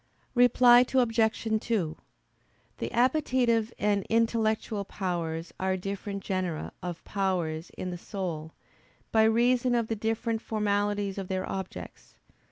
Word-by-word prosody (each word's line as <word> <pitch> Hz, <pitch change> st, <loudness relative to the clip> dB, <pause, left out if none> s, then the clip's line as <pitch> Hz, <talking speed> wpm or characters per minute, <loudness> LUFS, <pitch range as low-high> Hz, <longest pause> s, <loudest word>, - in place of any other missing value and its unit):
Reply 245 Hz, 0 st, +7 dB
Obj. 225 Hz, -3 st, +2 dB
2: 185 Hz, -11 st, -1 dB, 0.8 s
The -, -, -3 dB
appetitive 245 Hz, -3 st, +2 dB
and 205 Hz, -1 st, +1 dB
intellectual 220 Hz, -2 st, +1 dB
powers 170 Hz, -4 st, -3 dB
are 190 Hz, 0 st, 0 dB
different 200 Hz, +1 st, -5 dB
genera 185 Hz, -4 st, -2 dB
of 175 Hz, -2 st, -5 dB
powers 175 Hz, -5 st, -1 dB
in 185 Hz, -, -4 dB
the 175 Hz, -, -6 dB
soul, 170 Hz, -6 st, -5 dB, 0.6 s
by 220 Hz, -, +4 dB
reason 245 Hz, +2 st, +3 dB
of 230 Hz, -2 st, 0 dB
the 225 Hz, -, 0 dB
different 225 Hz, +1 st, -1 dB
formalities 205 Hz, -2 st, -1 dB
of 190 Hz, -, -5 dB
their 185 Hz, 0 st, -2 dB
objects. 190 Hz, -1 st, -7 dB
205 Hz, 120 wpm, -28 LUFS, 185-230 Hz, 0.8 s, Reply